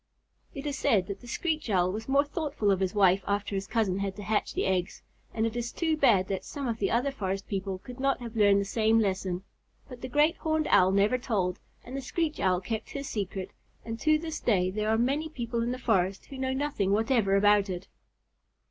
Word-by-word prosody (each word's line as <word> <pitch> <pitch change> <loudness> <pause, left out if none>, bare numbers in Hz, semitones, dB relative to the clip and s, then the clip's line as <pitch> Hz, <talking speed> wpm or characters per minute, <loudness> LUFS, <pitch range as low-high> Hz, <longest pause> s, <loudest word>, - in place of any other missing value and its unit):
It 275 +1 -6
is 285 -2 -3
said 195 -4 +3
that 200 0 -6
the 240 - -12
Screech 310 +1 -2
Owl 185 -2 +2
was 220 +5 -6
more 280 +1 +4
thoughtful 290 - -1
of 190 - +2
his 190 +1 -1
wife 190 -1 +4
after 200 0 -1
his 195 0 -2
cousin 215 -4 0
had 195 -1 -2
to 205 - -8
hatch 215 +1 -1
the - - 0
eggs, 185 -2 -1 0.3
and 225 0 0
it 230 0 -2
is 240 0 -3
too 320 -2 0
bad 220 -11 +4
that 195 -1 -3
some 280 -3 -5
of 230 -1 -2
the 195 - +1
other 250 +4 +1
forest 195 -6 -3
people 195 -1 -3
could 250 +7 -11
not 275 0 +1
have 235 -2 -8
learned 205 -2 +5
the 200 - -1
same 220 +2 +2
lesson; 190 -3 0 0.4
but 250 -3 -11
the - - -4
Great 300 +6 +3
Horned 315 -1 0
Owl 185 0 +6
never 205 +6 +3
told, 195 -7 -1 0.2
and 250 - -8
the 275 - -3
Screech 310 +4 -2
Owl 185 -1 +2
kept 220 +3 -4
his 280 -1 -5
secret, 195 -2 -4 0.3
and 225 0 -5
to 310 -1 +3
this 320 0 -5
day 185 -5 +2
there 215 +2 -1
are 220 - +3
many 280 +7 0
people 235 -5 -3
in 235 +1 -1
the 250 - -3
forest 195 -6 0
who 270 - -9
know 260 0 -1
nothing 265 -8 -1
whatever 220 -2 +2
about 205 0 +4
it. 180 0 -5
220 Hz, 230 wpm, -28 LUFS, 195-265 Hz, 0.4 s, Owl